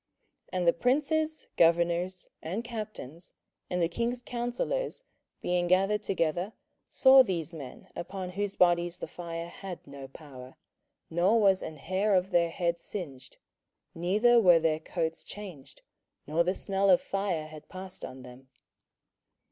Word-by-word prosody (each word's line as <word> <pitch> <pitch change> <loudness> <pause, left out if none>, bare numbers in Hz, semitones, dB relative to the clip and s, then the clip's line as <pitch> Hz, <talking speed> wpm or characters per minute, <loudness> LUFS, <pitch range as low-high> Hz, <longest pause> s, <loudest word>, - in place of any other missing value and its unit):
27:003:027 - - -2
And 175 - 0
the 170 - +6
princes, 305 - 0
governors, 170 +2 +2
and 190 +8 -3
captains, 215 - -7 0.4
and 180 -1 0
the - - +3
king's 235 +7 -2
counsellors, 245 - -2 0.4
being 175 0 +1
gathered 195 +3 +3
together, 180 0 -1 0.4
saw 265 0 +7
these 170 - -1
men, 140 -6 -9
upon 185 +1 -5
whose 200 +1 -2
bodies 175 -1 +3
the - - -6
fire 170 -1 -6
had 185 0 -8
no 140 -1 -9
power, 130 -3 -12 0.6
nor 185 +7 +3
was 195 -3 +4
an 155 - -6
hair 190 +7 +1
of 185 +1 +1
their 170 -1 +3
head 170 0 -1
singed, 145 -9 -8 0.6
neither 210 +8 +4
were 175 -4 +7
their 160 -1 +1
coats 165 0 -3
changed, 175 -10 -10 0.4
nor 160 +3 +2
the 180 +2 0
smell 195 0 +1
of 180 - +7
fire 195 -5 -2
had 155 -1 -12
passed 185 0 -7
on 130 0 -8
them. 125 +1 -13
180 Hz, 145 wpm, -29 LUFS, 165-200 Hz, 0.6 s, saw